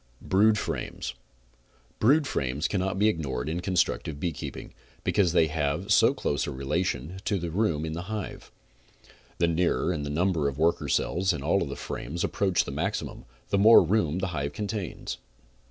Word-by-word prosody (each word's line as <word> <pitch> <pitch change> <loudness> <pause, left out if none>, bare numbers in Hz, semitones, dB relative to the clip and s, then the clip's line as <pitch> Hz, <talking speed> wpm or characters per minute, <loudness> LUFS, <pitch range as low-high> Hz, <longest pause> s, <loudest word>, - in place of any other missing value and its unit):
BROOD 105 +3 +4
FRAMES - - -4 0.9
Brood 145 +7 +4
frames 70 - -1
cannot 95 -1 -1
be 105 +2 +4
ignored 70 - -1
in 80 +3 -2
constructive 90 -5 0
beekeeping, 80 -2 -5 0.3
because 95 -5 +2
they 85 -1 +4
have 80 +5 0
so 115 +4 +6
close 70 - -1
a - - -3
relation 75 +4 -2
to 100 -3 0
room 85 -5 0
in 80 - -4
the 85 - -4
hive. 105 -4 -5 0.9
The 85 - +2
nearer 85 +1 +1
the 75 -2 -4
number 80 -1 +1
of 70 -1 -3
worker 80 +2 +1
cells 90 +1 +1
in 85 - -5
all - - +2
the - - -5
frames 85 +4 -4
approach 95 -3 +1
the - - -5
maximum, 90 +9 -3 0.2
the 100 - +2
more 110 +1 +8
room 85 -3 +1
the 95 0 -1
hive 70 -1 -2
contains. 105 -2 -4
85 Hz, 160 wpm, -27 LUFS, 75-100 Hz, 0.9 s, more